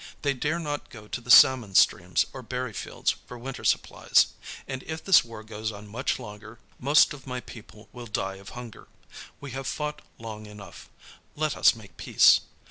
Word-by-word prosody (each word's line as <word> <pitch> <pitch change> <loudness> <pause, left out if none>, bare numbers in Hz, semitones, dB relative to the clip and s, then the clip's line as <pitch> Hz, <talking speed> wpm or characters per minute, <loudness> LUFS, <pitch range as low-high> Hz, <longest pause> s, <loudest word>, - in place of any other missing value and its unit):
They 140 -1 +2
dare 150 +5 -1
not 145 -3 -4
go 105 -3 -12
to 120 - -5
the 120 - -15
salmon 120 -5 +7
streams 90 0 +4
or 130 - -7
berry 125 -1 -4
fields - - -2
for 125 - -9
winter 130 +2 -7
supplies, - - +2 0.3
and 130 -1 -5
if 160 0 -5
this 195 - +6
war 115 -2 -10
goes 110 0 -5
on 105 0 -11
much 120 +6 -2
longer 110 -1 -11 0.2
most 145 +4 +4
of 140 -2 -13
my 125 -1 -3
people 110 -3 -13
will 120 -1 -9
die 95 -2 -3
of 100 0 -12
hunger. 120 -3 -10 0.5
We 140 -1 -8
have 135 +1 -5
fought 150 +2 -4 0.2
long 110 -2 -8
enough; 105 -1 -12 0.5
let - - -1
us - - +5
make - - -15
peace. - - +5
120 Hz, 185 wpm, -26 LUFS, 105-135 Hz, 0.5 s, salmon